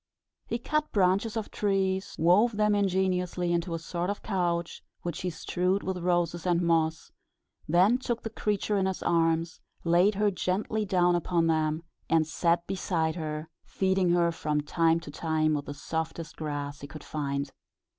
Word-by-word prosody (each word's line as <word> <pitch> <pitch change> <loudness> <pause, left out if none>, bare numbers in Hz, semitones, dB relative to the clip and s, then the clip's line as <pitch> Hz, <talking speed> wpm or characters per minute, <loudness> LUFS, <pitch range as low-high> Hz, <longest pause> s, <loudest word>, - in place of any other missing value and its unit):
He 235 - -1
cut 305 +5 -1
branches 200 +3 +2
of 220 - -4
trees, 195 -1 0
wove 205 +8 +4
them 210 0 +3
ingeniously 185 -3 +1
into 170 0 -1
a - - -1
sort 170 +2 -3
of 205 - -4
couch, 175 -4 -1 0.2
which 175 -1 -4
he 180 - -1
strewed 180 +3 -1
with 190 -1 -2
roses 175 -1 0
and 175 -1 +3
moss; 165 -2 +1 0.6
then 190 +9 +4
took 240 -2 -3
the 225 - -4
creature 210 -1 -1
in 190 - +1
his 190 - -3
arms, 165 0 +1 0.2
laid 175 +5 +4
her 205 +1 +2
gently 205 +4 -1
down 180 -3 +3
upon 175 -1 +1
them, 155 0 +1 0.3
and 165 -1 +4
sat 170 +2 +1
beside 170 -4 -1
her, 155 -2 -4 0.2
feeding 190 -1 +1
her 170 -1 +3
from 150 -2 -1
time 165 +2 +2
to 155 - -9
time 155 0 0
with 145 -1 -2
the 145 - -6
softest 160 +2 -4
grass 145 -2 -4
he 140 - -7
could 150 +1 -10
find. 140 -2 -3
175 Hz, 165 wpm, -28 LUFS, 160-190 Hz, 0.6 s, wove